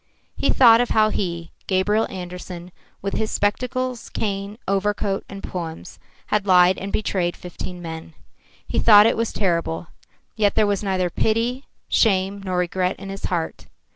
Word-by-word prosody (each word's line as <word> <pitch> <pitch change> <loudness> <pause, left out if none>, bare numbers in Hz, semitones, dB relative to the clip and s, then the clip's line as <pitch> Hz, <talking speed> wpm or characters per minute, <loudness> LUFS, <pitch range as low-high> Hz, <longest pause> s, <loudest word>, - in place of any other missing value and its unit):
He - - 0
thought 235 -2 +7
of 245 - -1
how 215 -1 +4
he, 170 -3 -3 0.2
Gabriel 205 +3 +2
Andersen, 180 -1 -8 0.3
with 195 - -2
his 220 - -1
spectacles, 250 +4 -1
cane, 200 0 -3
overcoat 195 0 0
and 195 0 -9
poems, 165 -3 -6 0.3
had 205 -1 0
lied 180 0 +5
and 195 +1 -5
betrayed 180 -4 -1
fifteen 180 0 -8
men. 160 0 -8 0.5
He - - 0
thought 210 -2 +8
it 225 - +3
was 230 0 -1
terrible, 170 - -1 0.5
yet 205 -2 +2
there 215 - +4
was 205 -1 0
neither 185 -3 0
pity, 235 +7 0 0.2
shame 195 -2 +2
nor 185 -2 -2
regret 180 +1 0
in 195 - -9
his 195 0 -5
heart. 170 -3 -3
195 Hz, 155 wpm, -22 LUFS, 180-215 Hz, 0.5 s, thought